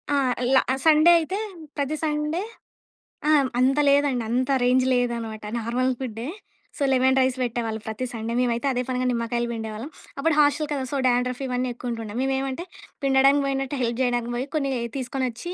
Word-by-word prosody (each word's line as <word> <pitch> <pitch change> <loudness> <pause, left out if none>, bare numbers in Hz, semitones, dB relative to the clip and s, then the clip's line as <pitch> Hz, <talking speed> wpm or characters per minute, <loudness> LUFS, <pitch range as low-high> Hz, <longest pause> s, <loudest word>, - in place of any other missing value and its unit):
ఆ! - - +3 0.4
ల - - +7 0.3
సండే 315 +2 +7
అయితే 350 +4 -3 0.4
ప్రతి 285 +1 -1
సండే 300 +2 -1 0.9
ఆ! - - +5 0.3
అంత 265 +3 +3
లేదండి. 280 -4 +3
అంత 255 +3 +1
రేంజ్ 255 +1 +3
లేదనమాట 235 -3 -1 0.2
నార్మల్ 245 +3 0
ఫు‌డ్డే. 235 -2 -5 0.5
సో 290 - -1
లెమన్ 260 0 +3
రైస్ 260 0 +1
పెట్టేవాళ్ళు 230 -2 -2
ప్రతి 220 +4 -3
సండే 230 0 -4
మేమైతే 240 +1 0
అదే 250 -1 0
పనిగా 255 0 -1
నిమ్మకాయలు 235 0 -1
పిండేవాళ్ళం 220 +3 -5 0.3
అప్పుడు 325 +3 +2
హాస్టల్ 295 +1 +3
కదా! 275 -2 -2
సో 285 - -1
డాండ్రఫ్ 250 +1 +1
ఇవన్నీ 250 0 -1
ఎక్కువుంటుండే. 230 -3 -5
మేము 270 0 +1
ఏమంటే 270 +5 -4 0.4
పిండడానికి 275 +1 +4
పోయినట్టు 270 0 -2
హెల్ప్ 235 +1 -1
చేయడానికి 240 -1 0
పోయి 255 +3 -3
కొన్ని 275 -3 0 0.3
తీసుకొ‌నొచ్చి 260 +4 -3
255 Hz, 160 wpm, -24 LUFS, 240-275 Hz, 0.9 s, ల